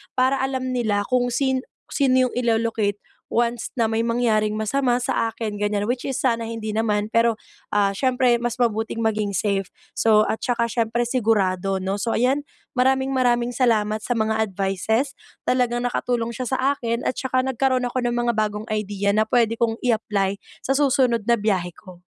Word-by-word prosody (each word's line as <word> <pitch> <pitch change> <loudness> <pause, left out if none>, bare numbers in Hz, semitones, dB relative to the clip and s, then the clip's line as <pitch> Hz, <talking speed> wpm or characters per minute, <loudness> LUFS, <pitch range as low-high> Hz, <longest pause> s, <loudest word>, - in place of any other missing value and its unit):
para 260 +2 +2
alam 260 -1 -2
nila 220 -5 0
kung 250 -1 +3
sin 265 0 0 0.3
sino 260 -2 +3
yung - - -9
ilo-locate 225 -4 0 0.3
once 235 0 0
na 230 - +4
may 225 0 0
mangyaring 230 -3 +1
masama 245 +3 +1
sa 230 -2 0
akin 215 -2 -4
ganyan, 205 0 -1
which 245 0 -1
is 270 - -2
sana 230 -3 +1
hindi 220 -2 -4
naman, 210 -2 0
pero, 230 -1 +3 0.3
ah, 200 -1 +2
siyempre 255 0 +2
mas 240 +1 -2
mabuting 225 -1 0
maging 215 -2 0
safe. 195 -2 0 0.3
So, 215 -1 +4
at 220 - -2
tsaka 240 -1 +1
syempre 230 +1 0
sigurado, 195 -6 +1
‘no? 190 +1 -2
So 230 +2 -1
ayan, 260 +4 +2 0.3
maraming-maraming 255 -2 +2
salamat 220 -4 +1
sa 240 +2 -2
mga 220 0 +1
advices. 200 +5 -1 0.3
Talagang 245 -1 +1
nakatulong 240 -1 -1
siya 250 +1 -4
sa 260 - 0 0.2
akin 235 -3 -3
at - - +1
tsaka 255 0 0
nagkaroon 260 -1 +1
ako 250 +1 -2
ng 240 - 0
mga 240 0 +1
bagong 215 0 -1
idea 205 -1 -1
na 215 +1 +1
pwede 230 -2 +2
kong 225 -1 +1
i-apply 205 -4 0 0.3
sa 270 - +2
susunod 260 -5 +2
na 235 - +5
biyahe 195 -4 0
ko. 180 -3 -14
230 Hz, 170 wpm, -23 LUFS, 215-250 Hz, 0.3 s, na